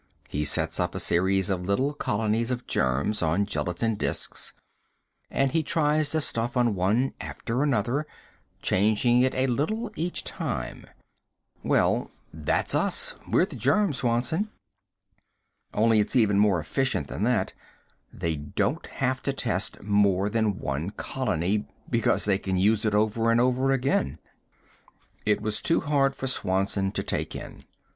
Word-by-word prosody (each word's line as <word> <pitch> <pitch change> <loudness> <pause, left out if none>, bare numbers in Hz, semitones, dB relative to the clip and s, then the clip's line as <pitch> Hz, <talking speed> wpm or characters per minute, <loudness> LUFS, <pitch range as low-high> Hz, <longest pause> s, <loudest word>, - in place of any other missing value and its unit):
He 75 +1 -2
sets 70 - +1
up - - -1
a - - -1
series 95 +3 +2
of 90 -1 -2
little 130 +9 +1
colonies 110 -3 -1
of 125 -1 -3
germs 70 +11 0
on 85 +5 +1
gelatine 100 +2 -1
disks - - -2 0.8
and 135 -1 +1
he 165 - +2
tries 150 -1 +2
the 160 - +1
stuff 120 -2 0
on 120 -3 +3
one 105 +8 +1
after 120 +3 -3
another, 140 +1 0 0.6
changing 110 +5 +3
it 130 +1 +1
a 130 - +2
little 205 - -1
each 175 +3 -2
time. - - -4 0.8
Well, - - +1 0.2
that's - - 0
us - - +4
we're - - +3
the - - -10
germs, 205 -10 +2
Swanson. 125 - 0 1.2
Only 110 0 +3
it's 105 - 0
even 105 -5 +4
more 100 -4 +4
efficient 135 - -1
than - - -6
that. 125 -2 +1 0.6
They 80 -2 -3
don't 75 0 -2
have 130 0 -2
to 140 - -1
test 110 -7 -1
more 100 -1 +2
than 110 -4 +1
one 70 +4 -3
colony, 105 -4 -2 0.2
because 115 -2 +2
they 100 -2 +2
can 95 -2 -2
use 105 +4 +2
it 105 -1 +1
over 110 +2 +2
and 115 0 +4
over 130 +2 +2
again." 125 - 0 1.1
It 105 -1 +2
was 105 -1 -2
too 165 - +2
hard 135 -2 +1
for - - -5
Swanson 95 -4 0
to - - -2
take - - -3
in. - - -9
115 Hz, 150 wpm, -26 LUFS, 100-135 Hz, 1.2 s, us